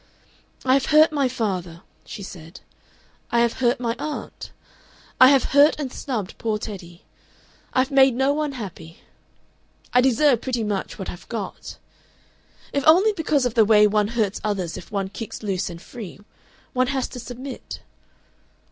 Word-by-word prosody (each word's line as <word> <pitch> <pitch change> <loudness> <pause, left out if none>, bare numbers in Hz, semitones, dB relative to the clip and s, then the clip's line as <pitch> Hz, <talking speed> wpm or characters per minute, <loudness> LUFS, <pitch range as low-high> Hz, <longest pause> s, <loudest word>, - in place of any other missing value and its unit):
"I 260 - +4
have 275 0 +2
hurt 310 +2 +6
my 285 -3 +1
father," 185 -8 -3 0.2
she 205 - -8
said; 175 -1 -11 0.7
"I 235 - +3
have 235 -1 0
hurt 240 -1 +2
my 235 -2 -1
aunt. 300 -1 -6 0.7
I 255 - +9
have 275 -2 +4
hurt 290 +2 +5
and 270 -4 -4
snubbed 225 -9 -4
poor 220 -2 -1
Teddy. 185 -5 -9 0.7
I've 260 +2 +1
made 265 -2 +5
no 265 +2 +2
one 300 -1 -2
happy. 185 -8 -9 0.9
I 250 - +6
deserve 260 0 +3
pretty 245 -3 -2
much 205 -3 -3
what 190 - -5
I've 175 - -13
got.... 220 -5 -6 1.0
"If 280 - 0
only 380 +7 +6
because 310 -7 0
of 245 - -1
the 225 - +5
way 210 0 +6
one 210 0 +2
hurts 210 -3 0
others 190 -6 -2
if - - -10
one 195 -2 -2
kicks 220 +2 -7
loose 195 -2 -2
and 170 -1 -8
free, 205 0 -10 0.5
one 255 0 +2
has 265 -1 -1
to 250 - -8
submit.... 250 +2 -8
235 Hz, 160 wpm, -23 LUFS, 200-270 Hz, 1.0 s, I